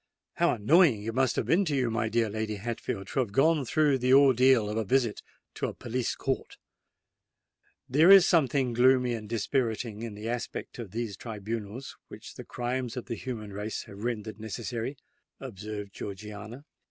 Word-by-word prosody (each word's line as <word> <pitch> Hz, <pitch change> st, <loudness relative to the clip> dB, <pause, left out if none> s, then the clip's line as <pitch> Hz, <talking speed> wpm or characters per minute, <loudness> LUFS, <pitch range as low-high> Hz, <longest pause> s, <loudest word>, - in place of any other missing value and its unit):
How -, -, +3 dB
annoying 125 Hz, -, +4 dB
it 115 Hz, +1 st, -3 dB
must 130 Hz, 0 st, +1 dB
have -, -, -1 dB
been 180 Hz, +5 st, +3 dB
to 150 Hz, -4 st, 0 dB
you, 125 Hz, -4 st, +1 dB
my 115 Hz, 0 st, -1 dB
dear 115 Hz, 0 st, +1 dB
Lady 110 Hz, 0 st, -3 dB
Hatfield, 105 Hz, -2 st, -4 dB
to -, -, -1 dB
have 120 Hz, -6 st, 0 dB
gone 150 Hz, +6 st, +3 dB
through 145 Hz, 0 st, +2 dB
the 130 Hz, +1 st, +4 dB
ordeal 130 Hz, -4 st, +5 dB
of 105 Hz, -, -3 dB
a 110 Hz, -, 0 dB
visit 115 Hz, 0 st, +1 dB, 0.3 s
to -, -, -2 dB
a -, -, -6 dB
police 120 Hz, 0 st, -2 dB
court!" -, -, -3 dB, 1.3 s
"There 155 Hz, +7 st, +5 dB
is 195 Hz, -2 st, +9 dB
something 135 Hz, -6 st, +2 dB
gloomy 125 Hz, 0 st, +4 dB
and 110 Hz, -2 st, -6 dB
dispiriting 115 Hz, -1 st, -1 dB
in 115 Hz, -3 st, -6 dB
the 105 Hz, +2 st, -6 dB
aspect 120 Hz, +1 st, -5 dB
of 115 Hz, -4 st, -6 dB
these 110 Hz, 0 st, -4 dB
tribunals 110 Hz, +3 st, -6 dB
which -, -, -11 dB
the -, -, -9 dB
crimes 125 Hz, 0 st, -3 dB
of 125 Hz, -, -5 dB
the 115 Hz, -, -4 dB
human 110 Hz, -5 st, -6 dB
race 105 Hz, +2 st, -4 dB
have 100 Hz, +1 st, -11 dB
rendered 110 Hz, -3 st, -4 dB
necessary," 115 Hz, +4 st, -4 dB, 0.4 s
observed 105 Hz, -4 st, -7 dB
Georgiana. 105 Hz, +6 st, -8 dB
115 Hz, 175 wpm, -28 LUFS, 110-130 Hz, 1.3 s, is